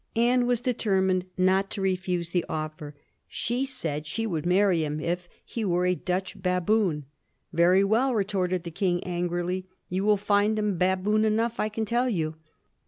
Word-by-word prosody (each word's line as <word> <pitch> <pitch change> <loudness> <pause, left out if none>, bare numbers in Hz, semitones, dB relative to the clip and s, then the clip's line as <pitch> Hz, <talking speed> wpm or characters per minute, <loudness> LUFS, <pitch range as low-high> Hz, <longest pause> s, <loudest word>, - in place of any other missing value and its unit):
Anne 245 +2 +3
was 245 -2 +2
determined 190 -7 +1
not 190 +1 +3
to - - -5
refuse 180 -3 -1
the 175 -2 +1
offer; 155 -1 -5 0.3
she 245 +4 -1
said 160 - -4
she 225 +8 -2
would 170 -6 -2
marry 180 -2 +3
him 150 0 -2
if 175 +2 -3 0.2
he 230 - -4
were 180 -2 +1
a 180 - +3
Dutch 180 +1 -3
baboon. 180 -3 +1 0.2
" - - -44
Very 175 +3 +5
well," 235 +6 +2
retorted 185 -4 0
the 170 - -6
King, 175 0 0
angrily; 175 +1 -2
" - - -48
you 185 +2 0
will 210 0 +4
find 205 +1 +2
him 210 -2 0
baboon 190 +4 +2
enough, 225 +2 +1
I 215 - +1
can 220 +1 -2
tell 240 +4 +1
you." 160 -8 -1
185 Hz, 175 wpm, -27 LUFS, 175-215 Hz, 0.3 s, Very